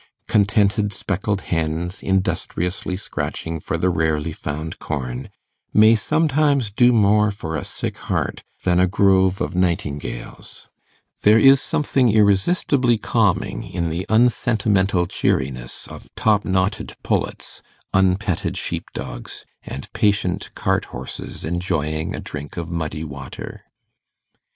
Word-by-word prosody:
Contented 105 0 +2
speckled 100 +1 -2
hens, 80 +2 -2
industriously 95 -1 -1
scratching 80 -4 -4
for 80 - -3
the 90 +2 +1
rarely 80 -1 0
found 75 +1 -5
corn, 65 -4 -4 0.5
may 110 +1 +7
sometimes 140 -1 +2
do 120 +4 +5
more 105 -2 +4
for 80 -6 -5
a 75 - -2
sick - - -4
heart - - -1 0.2
than 90 -1 +3
a 90 - +4
grove 95 0 +3
of - - -2
nightingales; 75 -9 -3 0.5
there 105 +1 +6
is 135 +3 +7
something 130 -5 +1
irresistibly 115 - +3
calming - - 0
in 85 -2 -3
the 85 +4 -3
unsentimental 110 -5 +2
cheeriness 65 -6 -2
of - - -11
top 105 -2 +2
knotted 95 +1 -1
pullets, - - -2 0.3
unpetted 95 -1 +1
sheep - - -3
dogs, - - -6 0.2
and 70 - -7
patient 105 -5 +1
cart - - 0
horses 65 +2 -7
enjoying 80 -2 -2
a - - -5
drink 75 +2 -7
of 85 0 -4
muddy 80 -2 -3
water. 70 -4 -8
95 Hz, 120 wpm, -21 LUFS, 80-105 Hz, 0.5 s, may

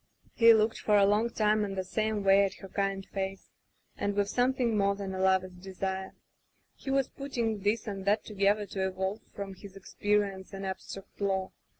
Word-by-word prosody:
He 230 0 +7
looked 220 0 +3
for 210 -1 +3
a 200 - +6
long 210 +3 +2
time 215 -1 +2
in 195 -1 -3
the 190 - -2
same 215 +2 -1
way 195 0 +6
at 195 - -1
her 195 - -10
kind 195 0 -2
face, 195 -1 -4 0.4
and 205 0 -2
with 205 0 +1
something 245 -1 +1
more 200 -1 +2
than 195 -1 -5
a 190 - -4
lover's 190 -1 +2
desire. 190 +1 -5 0.6
He 275 - -9
was 270 -1 +2
putting 235 -6 -3
this 205 +3 0
and 195 -2 -5
that 210 +2 +2
together 205 0 +1
to 190 -1 -2
evolve 190 +3 -3
from 200 -1 -5
his 195 +1 -12
experience 200 -1 -1
an 195 0 -5
abstract 195 +1 -7
law. 190 -1 0
200 Hz, 190 wpm, -30 LUFS, 190-215 Hz, 0.6 s, He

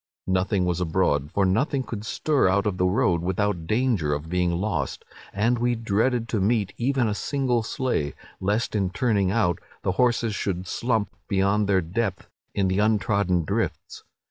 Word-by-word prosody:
Nothing 95 0 +1
was 90 0 -1
abroad, 80 -5 +1
for 100 - +2
nothing 130 +8 +1
could 110 -4 -6
stir 145 -4 +1
out 100 +1 +2
of 100 -3 -1
the 90 - +3
road 90 -4 +2
without 90 -1 -1
danger 110 - +1
of 75 +2 -7
being 90 0 +1
lost; 95 +5 -2 0.3
and 115 +4 +1
we 120 0 +1
dreaded 115 +2 0
to 110 - 0
meet 105 -1 +1
even 130 0 +1
a 105 - 0
single 130 +1 0
sleigh, 110 - -2 0.2
lest, 105 +4 0
in 95 -3 +1
turning 100 -1 +1
out, 95 -5 +1 0.2
the - - +1
horses 115 +1 +1
should 95 -3 -2
'slump' 115 0 -1
beyond 100 +1 +2
their 95 -2 +4
depth 95 +4 -3 0.2
in 100 -1 +2
the 95 +2 0
untrodden 100 -5 +2
drifts. - - -3
100 Hz, 170 wpm, -25 LUFS, 90-115 Hz, 0.3 s, their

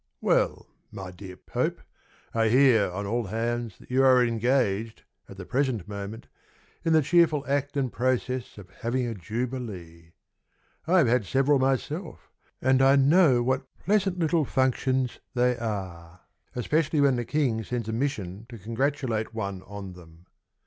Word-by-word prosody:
Well, - - +1 0.3
my 95 -3 -7
dear 90 0 -10
Pope, - - -2 0.5
I 115 -1 +2
hear 120 -5 +5
on 100 +3 -4
all 115 +3 -1
hands 115 +1 -3
That - - -16
you 130 +1 +3
are 130 -2 +6
engaged, 115 -2 0 0.3
at 100 - -11
the 95 - -8
present 125 -7 -1
moment, 100 +2 -7 0.6
In 165 -1 +2
the 155 -1 +5
cheerful 160 -2 +3
act 140 +1 -1
and 130 -3 -1
process 130 -1 -1
Of 95 -2 -12
having 120 +5 -2
a 115 - -3
Jubilee. 100 -6 -6 0.7
I 185 +3 +4
have 160 -8 +5
had 120 -2 +2
several 135 +3 +3
myself 140 +6 -2 0.3
And 130 +1 +4
I 135 +1 +6
know 140 -2 +5
what 130 +2 -1 0.2
pleasant 195 -2 +2
little 165 -1 +2
functions 130 -1 0 0.2
they 125 0 +3
are, 90 -6 -5 0.3
Especially 150 +5 0
when 140 -2 +4
the 120 - -1
King 125 -5 0
Sends 120 -1 -4
a 110 - -2
mission 110 -5 -3
to 120 - -9
congratulate 115 0 -2
one 100 -4 -4
on 100 -2 -8
them. 85 -1 -16
120 Hz, 155 wpm, -26 LUFS, 105-135 Hz, 0.7 s, are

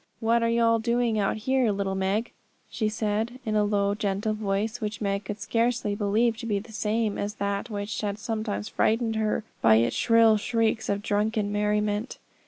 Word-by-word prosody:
'What 230 +1 +2
are 230 - +2
you 235 0 +2
all 230 0 +4
doing 235 -1 +1
out 200 +1 0
here, 255 +1 +1
little 195 -1 -2
Meg?' 195 +4 -1 0.4
she 215 -3 -1
said, 220 +3 -2
in 215 -1 -1
a 210 - +3
low, 200 -1 +1
gentle 205 +1 -1
voice, 215 +3 -2
which 210 0 -3
Meg 200 -1 -2
could 210 +1 -5
scarcely 230 0 0
believe 215 +3 +1
to 230 0 -6
be 210 -2 +1
the 220 +3 -8
same 215 0 -1
as 205 +1 -3
that 200 +3 -2
which 205 0 -4
had 205 -1 -2
sometimes 215 -1 -3
frightened 225 0 +1
her 215 0 0 0.2
by 110 -1 +6
its 115 +1 +2
shrill 230 -1 +5
shrieks 225 0 0
of 200 0 -1
drunken 210 0 0
merriment. 210 +2 0
215 Hz, 190 wpm, -26 LUFS, 205-230 Hz, 0.4 s, by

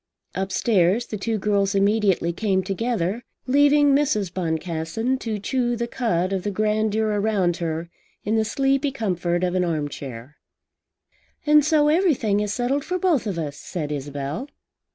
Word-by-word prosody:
Upstairs 195 +2 +1
the 215 - -5
two 220 +2 -1
girls 200 -1 +1
immediately 200 -4 +2
came 190 0 0
together, 205 +1 -2 0.2
leaving 285 +2 +4
Mrs. 215 - +1
Boncassen 170 +8 -2
to 220 -4 -3
chew 240 +3 -1
the 235 0 -2
cud 195 -7 -1
of 190 - -1
the 205 - -2
grandeur 215 +1 0
around 205 -4 +1
her 165 0 -3 0.4
in 215 +2 0
the 220 - +3
sleepy 270 +5 +1
comfort 180 -7 -1
of 180 -1 0
an 185 -1 +1
arm 155 -4 -1
chair. 135 0 -9 1.1
"And 300 0 +6
so 300 0 +3
everything 300 - +2
is 210 -1 -1
settled 255 +6 0
for 365 - -2
both 340 -10 +1
of 195 -4 -3
us," 150 -3 -4
said 150 -4 -5
Isabel. 145 - -4
205 Hz, 155 wpm, -23 LUFS, 175-245 Hz, 1.1 s, And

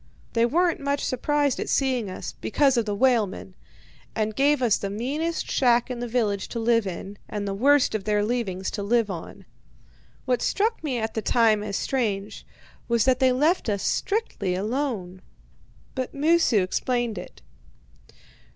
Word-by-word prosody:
They 230 0 +3
weren't 345 +5 +1
much 280 0 -1
surprised 285 +1 0
at - - -3
seeing 255 -6 +1
us 185 - -6
because 270 +4 +2
of 235 -2 +1
the 205 - -1
whalemen 210 -5 +1 0.6
and 215 -1 -1
gave 285 +1 +3
us 230 -4 +3
the 200 - -4
meanest 285 +11 -2
shack 245 -1 +3
in 245 - -4
the 245 - -3
village 215 -5 0
to 235 - -5
live 230 -2 +2
in, 195 +2 -7
and 205 -1 -3
the 195 - -2
worst 275 +6 +3
of 215 -3 -2
their 210 0 +1
leavings 205 -6 -2
to 205 - -4
live 220 0 +1
on. 170 -3 -8 0.8
What 250 -2 +1
struck 435 -1 0
me 270 -5 -1
at 220 -1 -2
the 220 - -2
time 220 -2 +3
as 205 -1 -4
strange 210 -6 -2 0.4
was 235 -2 +2
that 260 -1 +3
they 260 -1 +4
left 295 +2 +1
us 200 -2 -1
strictly 395 - -1
alone. 205 -4 -3 0.7
But 260 0 -4
Moosu 295 - +3
explained 240 +4 -1
it. - - -12
235 Hz, 165 wpm, -25 LUFS, 205-270 Hz, 0.8 s, they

